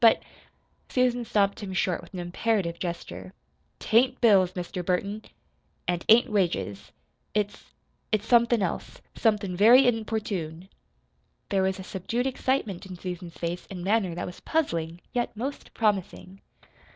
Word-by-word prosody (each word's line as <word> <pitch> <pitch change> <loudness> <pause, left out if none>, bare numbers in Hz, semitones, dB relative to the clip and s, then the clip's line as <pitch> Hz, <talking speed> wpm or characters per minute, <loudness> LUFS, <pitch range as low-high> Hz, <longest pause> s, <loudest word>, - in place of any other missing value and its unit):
But 230 -1 +6 0.3
" - - -41
Susan 250 -1 +2
stopped 200 -2 +1
him 195 -2 -5
short 185 -2 0
with - - -15
an - - -4
imperative 175 0 -1
gesture. 95 - -5 0.4
"T - - -4
ain't 255 +2 +5
bills, 195 -6 +5
Mr. 180 0 -4
Burton, 200 +4 -1 0.7
an't 175 -1 -1
ain't 225 +2 +7
wages. 175 - -1 0.4
It's 205 -1 -1 0.5
it's 215 -1 +1
somethin' 235 -2 +4
else. - - -4
Somethin' 210 -5 +1
very 240 +7 +7
importune." 205 -7 -2 0.8
There 195 -1 +2
was 190 0 +1
a - - -6
subdued 230 +7 -2
excitement 255 -8 -1
in 185 - -7
Susan's 175 -1 -6
face 170 +1 -4
and 180 -3 -6
manner 195 -3 +1
that - - -3
was 180 - -8
puzzling, 170 - -1
yet 240 -2 -1
most 270 +5 -5
promising. 195 -3 -1
195 Hz, 145 wpm, -27 LUFS, 180-225 Hz, 0.8 s, ain't